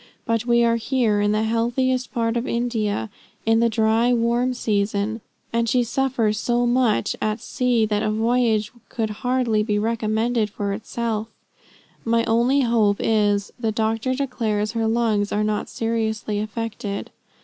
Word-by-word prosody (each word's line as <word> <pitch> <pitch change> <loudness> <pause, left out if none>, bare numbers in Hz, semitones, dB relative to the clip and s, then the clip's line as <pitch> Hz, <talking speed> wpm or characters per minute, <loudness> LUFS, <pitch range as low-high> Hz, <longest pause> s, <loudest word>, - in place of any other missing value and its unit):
But 230 0 -1
we 235 0 +4
are 230 0 +3
here 230 -4 +1
in 205 0 +2
the 215 +1 +1
healthiest 240 +3 0
part 230 -1 0
of 240 +2 -1
India, 220 - -1 0.3
in 225 0 +3
the 235 0 +3
dry, 225 +2 +2
warm 240 +2 +1
season, 210 0 -1 0.3
and 230 0 +1
she 250 +2 +3
suffers 240 -4 0
so 240 +1 +1
much 240 -2 +2
at 215 +1 -1
sea 245 -1 +1
that 210 -1 0
a 215 - 0
voyage 225 -1 +1 0.2
could 220 -2 -2
hardly 245 -4 +1
be 210 -1 0
recommended 220 +1 0
for 200 -1 -3
itself. 225 +1 -3 0.8
My 230 0 +2
only 240 +5 +2
hope 225 -5 +2
is, 205 -2 +1
the 225 -2 0
doctor 225 +4 0
declares 225 -6 -1
her 225 -1 -1
lungs 220 -3 +1
are 210 +1 +1
not 210 0 -1
seriously 220 -2 -2
affected. 215 -1 -4
225 Hz, 150 wpm, -22 LUFS, 215-240 Hz, 0.8 s, we